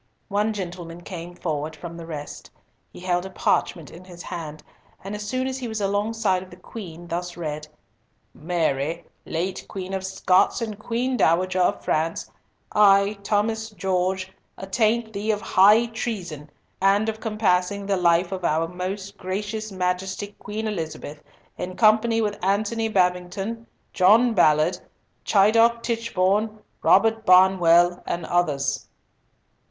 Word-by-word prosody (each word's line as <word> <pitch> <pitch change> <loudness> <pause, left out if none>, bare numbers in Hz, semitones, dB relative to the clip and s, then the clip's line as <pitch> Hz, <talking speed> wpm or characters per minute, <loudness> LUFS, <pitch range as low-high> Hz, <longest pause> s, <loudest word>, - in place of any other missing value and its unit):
One 210 +2 +1
gentleman 175 -4 -6
came 175 -1 -8
forward 155 -2 -3
from 170 +2 -8
the 165 -1 -9
rest. 150 -3 -7 0.4
He - - -12
held 180 -1 0
a 190 - -7
parchment 170 -3 -1
in 170 - -12
his 175 -2 -11
hand, 155 -3 -7 0.4
and 195 +2 -6
as 210 0 -5
soon 255 0 -1
as 265 0 -3
he 250 - -4
was 220 -1 -4
alongside 205 -1 0
of 185 - -11
the 180 - -12
Queen 175 -3 -9
thus 175 +1 -4
read:— 155 -2 -5 0.7
"Mary, 160 -1 -1 0.2
late 175 +3 -3
Queen 190 -1 -6
of 190 -1 -2
Scots 190 +1 +2
and 220 -3 -5
Queen 245 +3 -1
Dowager 185 +1 +2
of 180 - +1
France, 160 +2 -1 0.4
I, 200 0 +4
Thomas 220 +2 -1
Gorges, 185 0 -1 0.3
attaint 220 +3 0
thee 205 +2 -3
of 210 -2 +2
high 210 +2 +5
treason 185 -10 -5 0.3
and 200 +3 +3
of 220 0 -3
compassing 200 -3 0
the 200 0 +1
life 175 0 +2
of 185 -2 -4
our 165 0 +1
most 190 +3 -6
Gracious 210 +3 -4
Majesty 185 +2 -2
Queen 215 +2 -4
Elizabeth, 160 -6 -5 0.4
in 185 0 -4
company 225 +1 +4
with 205 -3 -3
Antony 215 +4 0
Babington, 190 +4 -1 0.3
John 220 +6 +5
Ballard, 155 -1 +3 0.5
Chidiock 230 +3 +4
Tichborne, 215 -2 0 0.2
Robert 225 0 +4
Barnwell, 180 -2 +5
and 170 -1 -2
others." 145 -6 0
190 Hz, 140 wpm, -24 LUFS, 175-215 Hz, 0.7 s, high